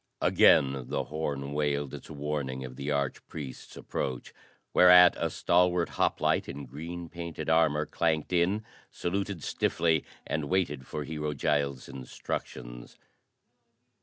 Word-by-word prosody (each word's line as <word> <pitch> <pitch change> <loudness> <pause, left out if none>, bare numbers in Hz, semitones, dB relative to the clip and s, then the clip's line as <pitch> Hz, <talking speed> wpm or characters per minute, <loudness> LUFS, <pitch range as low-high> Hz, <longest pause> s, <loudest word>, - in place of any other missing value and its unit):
Again 65 -2 +4
the - - -1
horn 70 -2 -4
wailed 75 -2 -1
its - - -9
warning 70 -3 -3
of 65 0 -9
the 70 +2 -4
arch 70 -2 -1
priest's 70 -4 -8
approach, 65 -2 -4 0.4
whereat 90 0 +8
a - - -1
stalwart 90 0 +2
hoplite - - +1
in 70 0 -6
green 85 +6 -7
painted 85 -1 -5
armor 75 -2 +3
clanked 80 +2 0
in, 95 +5 +2 0.2
saluted 95 -1 -3
stiffly 80 -2 +1 0.2
and 75 -1 -2
waited 75 -6 -1
for 75 - -4
Hero 75 0 -3
Giles' 70 -1 0
instructions. - - -7
75 Hz, 125 wpm, -29 LUFS, 70-85 Hz, 0.4 s, whereat